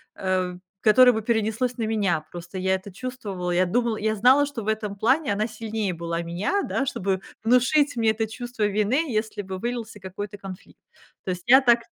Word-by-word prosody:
э, 185 -1 -1 0.3
которое 250 +4 +7
бы 220 - -2
перенеслось 225 +3 0
на 230 - -2
меня. 205 -8 +1
Просто 175 +2 -8
я 190 +1 +1
это 190 +2 -8
чувствовала, 200 -5 -5
я 180 +1 +3
думала, 230 +4 0
я 215 +1 0
знала, 255 +7 +5
что 280 -6 -6
в - - -9
этом 215 -2 -2
плане 260 +4 +2
она 210 +2 0
сильнее 220 -3 -3
была 170 0 -3
меня, 180 - -1
да, 270 - -1
чтобы 195 -6 -1 0.2
внушить 250 +5 +3
мне 225 -2 +3
это 220 0 -2
чувство 240 0 -5
вины, 210 +9 +1
если 215 -1 -2
бы 190 -1 -6
вылился 230 0 -4
какой-то 195 +2 -7
конфликт. 190 -2 -11 0.5
То 185 - -1
есть 180 -1 -5
я 260 +2 +9
так 240 -2 +5
215 Hz, 190 wpm, -24 LUFS, 190-240 Hz, 0.5 s, я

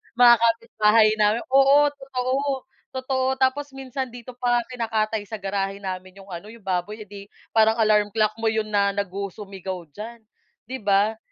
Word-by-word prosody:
mga 240 -1 +8
kapitbahay 225 -1 +3
namin 210 +2 +3
oo, 275 +2 +6
totoo, 265 -2 -3 0.6
totoo 260 0 -1
tapos 270 +2 0
minsan 265 0 -4
dito 245 0 -10
pa 245 -1 +2
nga 240 - +3
kinakatay 220 -3 -1
sa 220 - -5
garahe 195 0 -2
namin 185 0 -6
'yong 195 - -16
ano, 175 +3 -7
'yong 230 - -15
baboy 195 +3 -2
eh 210 - -10
'di 200 -1 -10 0.3
parang 220 0 +4
alarm 210 -2 +3
clock 215 -1 +1
mo 225 - -4
'yon 220 -1 0
na 200 -1 +2
nagusumigaw 195 -2 -5
diyan, 225 +8 -9 0.5
'di 260 - -3
ba? 205 +2 +3
220 Hz, 165 wpm, -24 LUFS, 200-245 Hz, 0.6 s, mga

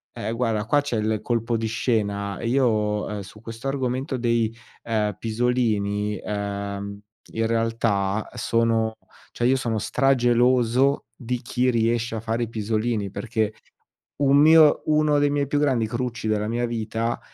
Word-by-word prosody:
Eh, 110 - -3
guarda 115 -3 -1
qua 145 +5 +3
c'è 140 -5 -2
il 110 0 0
colpo 115 0 -1
di 115 0 -1
scena: 100 -3 -1
io, 110 -4 +1
ehm, 105 - -4
su 105 +2 -12
questo 115 +3 -7
argomento 130 0 -2
dei, 115 -2 +1 0.3
ehm, 105 -3 -1
pisolini, 110 -3 0
ehm, 100 0 -4 0.3
in 115 0 0
realtà 115 -3 0
sono 115 -1 +1 0.4
cioè, 120 - 0
io 130 - +4
sono 120 -4 -1
strageloso 125 +2 +2
di 125 -1 -3
chi 125 +1 0
riesce 115 -1 0
a - - -2
fare 115 +1 -1
i 115 - -4
pisolini. 110 -1 -1
Perché 110 -2 -2 0.7
un 140 -1 +4
mio 155 0 +6
uno 150 -1 +3
dei 145 0 +3
miei 145 -1 0
più 145 +2 0
grandi 130 -6 +1
crucci 120 0 -3
della 105 -1 0
mia 120 +1 0
vita, 115 0 -2
115 Hz, 150 wpm, -24 LUFS, 110-125 Hz, 0.7 s, mio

